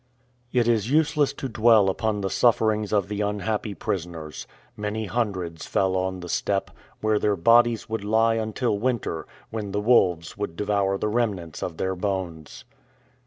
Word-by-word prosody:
It 120 -2 +2
is 115 -1 +2
useless 150 -1 +3
to 135 - -5
dwell 110 -3 +4
upon 105 +2 0
the 95 - -1
sufferings 110 -3 +2
of 100 -3 +2
the 105 0 -3
unhappy 105 0 -2
prisoners. 85 -4 -5 0.3
Many 105 +1 -3
hundreds 95 -8 -3
fell 95 -1 +1
on 95 0 -2
the 90 - -7
steppe, 95 +3 -1 0.3
where 110 -1 +2
their 105 -1 +1
bodies 115 +5 +4
would 110 -2 -3
lie 110 +2 +3
until 110 0 -1
winter, 115 -9 -2 0.2
when 105 -3 -4
the 105 - 0
wolves 95 -7 +2
would 100 -5 -4
devour 100 0 0
the 105 - -1
remnants 105 -8 -2
of 85 -3 -4
their 95 0 -1
bones. 90 -5 -4
105 Hz, 160 wpm, -25 LUFS, 95-110 Hz, 0.3 s, dwell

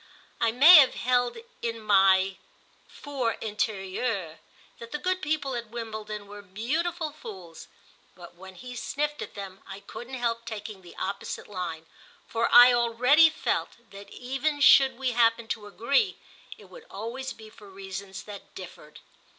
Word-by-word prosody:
I 230 - +2
may 300 +9 +9
have 275 -4 +6
held 245 - 0 0.2
in 230 -1 -3
my 195 -2 +3 0.5
'for 265 -6 -3
intérieur' 200 -4 -3 0.4
that 235 0 -10
the - - -2
good 370 +4 -2
people 300 -4 -2
at 235 -2 -5
Wimbledon 215 -2 -6
were 205 +1 -11
beautiful 305 - -3
fools, 190 - -11 0.5
but 175 -1 -13
when 190 +2 -13
he 250 +4 -10
sniffed 295 +4 -3
at - - -8
them 195 -2 -8
I 195 - -8
couldn't 240 +6 -9
help 235 -2 -2
taking 215 -3 -7
the 175 - -14
opposite 195 +1 -5
line, 175 -5 -6 0.4
for 230 0 0
I 245 +1 +9
already 250 +7 +5
felt 315 - -2
that 200 0 -12
even 270 +6 -3
should 270 -2 +6
we 260 -1 -1
happen 230 -1 +2
to 210 -2 -4
agree 280 - 0 0.4
it - - -16
would - - -15
always 245 +5 -6
be 220 -1 -12
for 205 -2 -15
reasons 195 0 -8
that 205 -2 -12
differed. 160 -4 -11
230 Hz, 150 wpm, -27 LUFS, 200-260 Hz, 0.5 s, may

